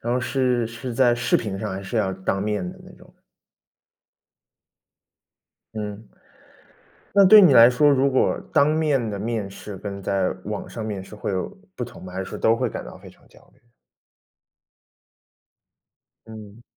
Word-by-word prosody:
然 120 +1 -2
后 125 - +1
是 125 -3 0
是 115 +2 -7
在 120 -1 +4
视 120 - +1
频 100 -3 -4
上？ - - -4
还 95 +1 -6
是 95 +4 -5
要 95 -3 0
当 95 +1 -2
面 105 -4 -2
的 - - -16
那 - - -14
种？ - - -19 2.6
嗯。 105 0 -6 1.1
那 200 -1 +6
对 210 +2 +9
你 165 -8 +6
来 115 0 +8
说， 145 +4 +3
如 140 0 +3
果 130 - +1
当 140 - +4
面 150 -7 0
的 100 - -4
面 110 -2 -3
试， 100 0 -9
跟 100 0 -7
在 95 -1 0 0.2
网 105 -1 -5
上 110 -2 -6
面 100 -3 -5
试 105 - -12
会 105 - -4
有 95 - -2 0.3
不 125 - -4
同 120 +1 -11
吗？ 90 0 -10
还 95 - -4
是 95 - -4
说 - - -7
都 115 +1 +3
会 - - -1
感 - - -7
到 - - -11
非 - - -14
常 - - -23
焦 - - -21
虑？ - - -29 2.7
嗯。 110 0 -12
110 Hz, 185 characters per minute, -23 LUFS, 100-125 Hz, 2.7 s, 对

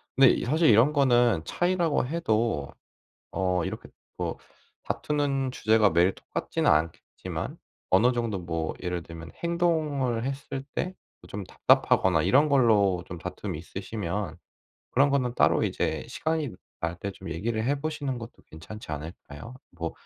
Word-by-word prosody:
근데 135 -1 +7
이 - - -1
사실 155 +5 +3
이런 115 +7 +6
거는 120 - +4
차이라고 175 -6 +1
해도 115 - 0 0.6
어 90 -2 0
이렇게 - - -6 0.3
뭐 - - -3 0.5
다투는 140 -3 -1
주제가 110 -3 +3
매일 85 +3 +4
똑같지는 - - -2
않겠지만 80 +2 -2 0.3
어느 125 +3 +5
정도 115 -5 -1
뭐 80 -2 -3
예를 90 -2 -3
들면 85 0 -10
행동을 155 -8 0
했을 135 0 -4
때 185 +1 -2 0.3
어 - - -13
좀 100 0 -5
답답하거나 90 -2 +3
이런 140 +11 +4
걸로 105 -9 +4
좀 90 - -7
다툼이 90 -1 -5
있으시면 95 -1 -4 0.5
그런 140 +3 +4
거는 130 -3 +1
따로 - - +3
이제 - - -1
시간이 160 -3 -1 0.3
날 85 +1 -2
때 100 - -4
좀 95 -1 -10
얘기를 110 +6 -2
해 140 +3 +1
보시는 145 -4 -3
것도 115 +1 -10
괜찮지 80 +6 -10
않을까요? 80 - -8 0.2
뭐 85 -1 -5
115 Hz, 300 characters per minute, -27 LUFS, 90-140 Hz, 0.6 s, 근데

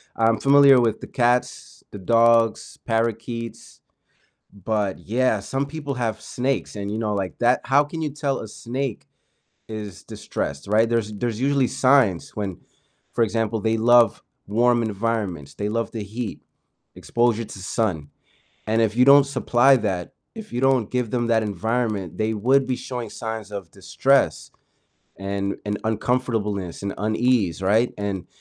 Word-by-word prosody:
I'm 115 0 +2
familiar 140 -1 +6
with 115 -3 0
the - - -7
cats, 120 0 -1
the 100 - -8
dogs, 115 +2 +2
parakeets, 115 0 -3 0.7
but, 100 -1 -2
yeah, 115 +4 0
some 135 +8 -2
people 140 -1 -5
have 110 -3 -2
snakes 130 0 -2
and, 100 0 -5
you 110 - -3
know, 105 -2 -1
like 95 -2 -3
that 120 +1 +3
how 140 +2 +4
can 160 +2 -6
you 150 - -1
tell 140 -1 -2
a 110 - -7
snake 125 +2 -5 0.6
is 105 -3 -7
distressed, 70 +6 -5
right? 110 +2 +3
There's 115 -2 -1
there's 115 +2 -3
usually 135 -2 +2
signs 130 - +2
when 100 -5 -4 0.6
for 115 - +2
example, 110 0 -1
they 110 +2 0
love 120 +1 +4 0.2
warm 120 +3 +2
environments, 100 -8 -3
they 105 0 -3
love 115 +1 -2
the 110 -3 -5
heat, 110 +2 -5 0.6
exposure 120 -1 0
to 100 - -10
sun, 90 -7 -2 0.6
and 110 +1 +2
if 110 0 +1
you 125 +1 +5
don't 140 0 +8
supply 135 -1 +3
that, 95 -6 -3 0.2
if 220 -1 -9
you 120 +2 -3
don't 130 -5 +2
give 125 -3 -1
them 120 -1 0
that 115 -1 +3
environment, 105 -2 -2
they 110 +1 0
would 130 +6 +2
be 130 - 0
showing 120 -4 -6
signs 110 -2 -6
of 100 -5 -7
distress, - - +1 0.7
and 100 +1 -3
and 105 0 -2
uncomfortableness, 110 -6 -1
and 100 - -3
unease, 110 -4 +1
right? 110 +6 +2
And 100 -3 -4
115 Hz, 155 wpm, -23 LUFS, 105-125 Hz, 0.7 s, don't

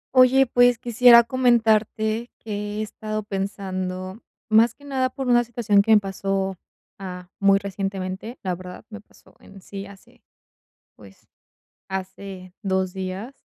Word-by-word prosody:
Oye, 260 +1 +6
pues, 245 -1 +4
quisiera 240 0 +6
comentarte 225 -2 +1
que 220 - -10 0.3
he - - -2
estado 215 0 -5
pensando, 190 0 -4 0.3
más 225 +1 +4
que 285 - -18
nada, 260 -2 0
por 265 +1 -5
una 240 -1 +4
situación 225 -4 +2
que 200 - -6
me 220 -1 +7
pasó, 195 -1 -2 0.4
ah, 180 -1 -8
muy 195 0 +5
recientemente, 195 +3 -5
la 185 -2 -1
verdad, 180 +3 -9
me 215 0 -9
pasó - - -24
en 195 - -15
sí 195 +1 -8
hace, 200 -1 -17 0.7
pues, 95 -2 -18 0.6
hace 190 -1 -7
2 190 -1 0
días. 190 +6 -5
200 Hz, 140 wpm, -23 LUFS, 190-235 Hz, 0.7 s, me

